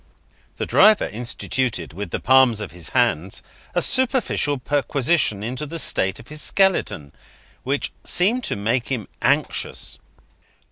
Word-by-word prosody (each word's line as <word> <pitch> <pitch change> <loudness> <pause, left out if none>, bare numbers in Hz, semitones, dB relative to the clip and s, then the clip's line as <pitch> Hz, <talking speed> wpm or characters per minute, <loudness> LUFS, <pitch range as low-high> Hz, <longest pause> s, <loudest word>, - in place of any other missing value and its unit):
The - - -2
driver 215 0 +5
instituted, 115 - -2
with 100 +2 -6
the - - -3
palms 130 -3 +4
of 105 - -6
his 85 -1 -7
hands, 90 +5 0 0.3
a - - +2
superficial 255 - +1
perquisition 140 -4 0
into 130 +6 -4
the 165 +3 -6
state 95 -10 +1
of 115 +5 -14
his 150 0 -5
skeleton; 180 - +1 0.5
which 140 +2 -2
seemed 225 +8 +2
to - - -1
make 115 +5 -1
him 125 -7 -3
anxious. - - -1
130 Hz, 135 wpm, -22 LUFS, 105-155 Hz, 0.5 s, driver